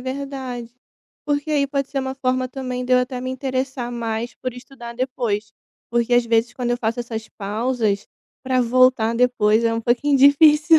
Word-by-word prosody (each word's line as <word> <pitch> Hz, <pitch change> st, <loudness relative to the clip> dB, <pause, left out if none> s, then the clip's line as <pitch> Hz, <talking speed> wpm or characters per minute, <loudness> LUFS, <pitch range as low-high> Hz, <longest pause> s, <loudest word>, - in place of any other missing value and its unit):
verdade, 260 Hz, -3 st, -5 dB, 0.5 s
porque 290 Hz, +1 st, -1 dB
aí 285 Hz, -2 st, +2 dB
pode 275 Hz, -1 st, -2 dB
ser 275 Hz, -, -2 dB
uma 265 Hz, 0 st, -3 dB
forma 255 Hz, -1 st, -1 dB
também 250 Hz, -1 st, -4 dB
de 255 Hz, -, -1 dB
eu 250 Hz, -, +6 dB
até 250 Hz, 0 st, -3 dB
me 255 Hz, -, -4 dB
interessar 260 Hz, -1 st, -3 dB
mais 230 Hz, 0 st, -3 dB
por 255 Hz, -2 st, -5 dB
estudar 245 Hz, -2 st, -10 dB
depois, 235 Hz, -4 st, -2 dB, 0.4 s
porque 240 Hz, +1 st, +1 dB
às 245 Hz, -1 st, +4 dB
vezes 230 Hz, 0 st, +1 dB
quando 245 Hz, -2 st, -2 dB
eu 240 Hz, -, +1 dB
faço 230 Hz, 0 st, -1 dB
essas 225 Hz, -2 st, -6 dB
pausas, 215 Hz, 0 st, -1 dB, 0.3 s
pra 255 Hz, -1 st, +1 dB
voltar 245 Hz, -2 st, +3 dB
depois 230 Hz, -3 st, +3 dB
é 230 Hz, 0 st, +2 dB
um 230 Hz, -, -1 dB
pouquinho 250 Hz, +5 st, +2 dB
difícil. 300 Hz, +3 st, +6 dB
250 Hz, 180 wpm, -21 LUFS, 235-265 Hz, 0.5 s, eu